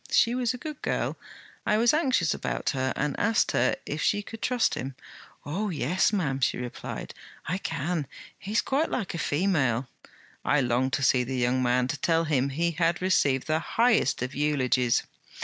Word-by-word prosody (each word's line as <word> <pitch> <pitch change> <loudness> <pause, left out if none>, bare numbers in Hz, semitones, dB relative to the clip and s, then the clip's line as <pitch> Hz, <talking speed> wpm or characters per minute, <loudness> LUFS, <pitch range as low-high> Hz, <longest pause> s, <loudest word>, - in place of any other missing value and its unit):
She 235 - +4
was 250 -2 0
a 250 - -5
good 305 +3 -7
girl; - - -1 0.5
I 210 - +2
was 235 +4 +4
anxious 260 - +2
about - - -2
her 130 -1 -1
and 150 0 -1
asked 225 +1 +2
her - - +2
if - - -4
she 205 - +1
could 225 +2 -10
trust 245 -9 +1
him. 135 -2 -4 0.5
"Oh, 195 +9 -2
yes, 170 +4 +1
ma'am," 150 -10 0
she 130 - +1
replied, 125 -1 -6 0.3
"I 180 +5 -2
can; 160 -3 -2 0.3
he's 210 +4 0
quite 290 +4 0
like 215 -7 -3
a 170 - -4
female." 145 -8 +1 0.6
I 150 - +3
longed 130 +1 +1
to 145 - 0
see 130 -1 +4
the 130 +1 -3
young 125 +1 +1
man, 125 0 +2
to 145 - -2
tell 165 +3 +2
him 140 -4 +1
he 170 +5 0
had 170 +1 +1
received 145 -8 +2
the 155 0 +1
highest 220 - +2
of 130 +2 -4
eulogies.' 130 -4 +1
155 Hz, 185 wpm, -27 LUFS, 130-205 Hz, 0.6 s, She